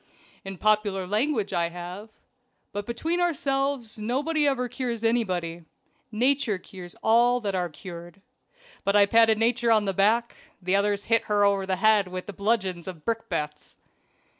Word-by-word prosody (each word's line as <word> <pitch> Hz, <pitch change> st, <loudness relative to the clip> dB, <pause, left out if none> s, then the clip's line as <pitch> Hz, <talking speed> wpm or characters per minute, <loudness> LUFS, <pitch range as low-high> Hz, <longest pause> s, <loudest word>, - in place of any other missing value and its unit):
"In 195 Hz, -1 st, -7 dB
popular 210 Hz, -2 st, +1 dB
language, 215 Hz, +1 st, -1 dB
I 170 Hz, -1 st, +1 dB
have. 180 Hz, +5 st, -8 dB, 0.6 s
But 205 Hz, 0 st, -5 dB
between 325 Hz, +9 st, -1 dB
ourselves 275 Hz, -8 st, -1 dB
nobody 290 Hz, +7 st, 0 dB
ever 255 Hz, -3 st, 0 dB
cures 240 Hz, -2 st, -4 dB
anybody. 180 Hz, -8 st, -1 dB, 0.5 s
Nature 245 Hz, -1 st, +1 dB
cures 180 Hz, -1 st, -11 dB
all 240 Hz, +2 st, +4 dB
that 200 Hz, -3 st, -2 dB
are 180 Hz, -2 st, -1 dB
cured. 170 Hz, +2 st, -10 dB, 0.6 s
But 200 Hz, +1 st, +1 dB
I 205 Hz, -1 st, +7 dB
patted 225 Hz, +1 st, +4 dB
Nature 235 Hz, +1 st, +1 dB
on 215 Hz, -2 st, +4 dB
the 195 Hz, -, -1 dB
back; 220 Hz, +5 st, +2 dB, 0.2 s
the 185 Hz, +1 st, 0 dB
others 205 Hz, 0 st, +1 dB
hit 230 Hz, 0 st, +1 dB
her 205 Hz, -1 st, +2 dB
over 200 Hz, -1 st, +1 dB
the 190 Hz, -, +1 dB
head 215 Hz, -1 st, +3 dB
with 185 Hz, +2 st, -7 dB
bludgeons 195 Hz, -4 st, -1 dB
and 175 Hz, -5 st, -8 dB
brick 230 Hz, 0 st, -2 dB
bats." 150 Hz, -4 st, -4 dB
210 Hz, 155 wpm, -26 LUFS, 185-235 Hz, 0.6 s, I